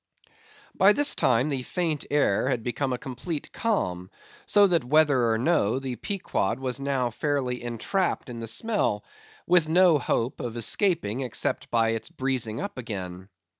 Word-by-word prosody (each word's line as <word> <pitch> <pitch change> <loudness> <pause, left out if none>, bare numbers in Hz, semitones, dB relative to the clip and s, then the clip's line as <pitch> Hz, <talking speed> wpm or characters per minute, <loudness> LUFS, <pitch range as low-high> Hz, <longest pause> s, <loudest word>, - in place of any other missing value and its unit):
By 195 +2 +5
this 290 +3 +3
time 125 +6 +2
the 135 -3 -1
faint 160 +1 -2
air 130 -5 +2
had 120 -4 -1
become 130 +3 -2
a 125 - -1
complete 145 +5 -6
calm; 90 - -1 0.4
so 205 -1 +6
that 175 -6 +2
whether 140 -3 +3
or 110 - +2
no, 130 -4 +2
the 135 -2 -4
Pequod 175 - -2
was 130 -1 -3
now 135 -3 -1
fairly 130 -1 -1
entrapped 120 - -1
in 120 -2 -7
the 115 - -5
smell, 115 - -1 0.4
with 170 -3 +3
no 175 -2 +5
hope 120 -1 -1
of 120 -1 -5
escaping 135 - 0
except 125 -3 -2
by 115 -1 +2
its 115 0 -3
breezing 130 -5 -2
up 200 -9 -5
again. 95 -5 -6
130 Hz, 160 wpm, -26 LUFS, 115-160 Hz, 0.4 s, so